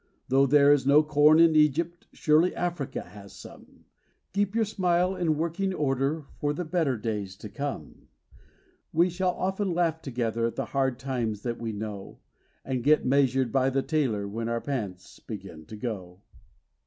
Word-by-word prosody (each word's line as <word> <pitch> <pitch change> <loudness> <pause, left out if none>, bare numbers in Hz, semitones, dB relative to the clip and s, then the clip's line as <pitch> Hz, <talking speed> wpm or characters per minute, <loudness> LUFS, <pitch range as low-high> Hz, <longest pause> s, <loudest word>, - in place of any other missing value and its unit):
Though 135 +1 +4
there 145 +1 +6
is 135 -2 0
no 145 +2 +6
corn 150 +1 +5
in 165 -1 +6
Egypt, 160 +3 +1
surely 160 +4 +2
Africa 175 -6 -3
has 100 +2 -13
some - - -14 0.5
Keep 200 +1 0
your 225 -1 +2
smile 185 -2 +1
in 160 -4 0
working 170 +4 -1
order 140 +1 -1
for 145 0 0
the 175 +4 -4
better 155 -6 0
days 105 -3 -4
to 105 - -10
come! 130 - -6 0.8
We 175 +3 +3
shall 180 +1 -1
often 190 -1 -1
laugh 165 -2 0
together 115 -4 -1
at 115 - -6
the - - -2
hard 135 -2 +1
times 120 -6 -3
that 120 -1 -3
we 115 -1 -3
know, 105 -2 -7 0.5
And 130 -3 -2
get 150 +2 +4
measured 130 -2 +2
by 135 +1 +2
the 135 0 0
tailor 130 -10 0
when 115 +3 -4
our 115 0 -1
pants 105 -10 -5
begin 95 -8 -9
to 110 - -9
go. 95 -6 -6
135 Hz, 165 wpm, -27 LUFS, 115-165 Hz, 0.8 s, there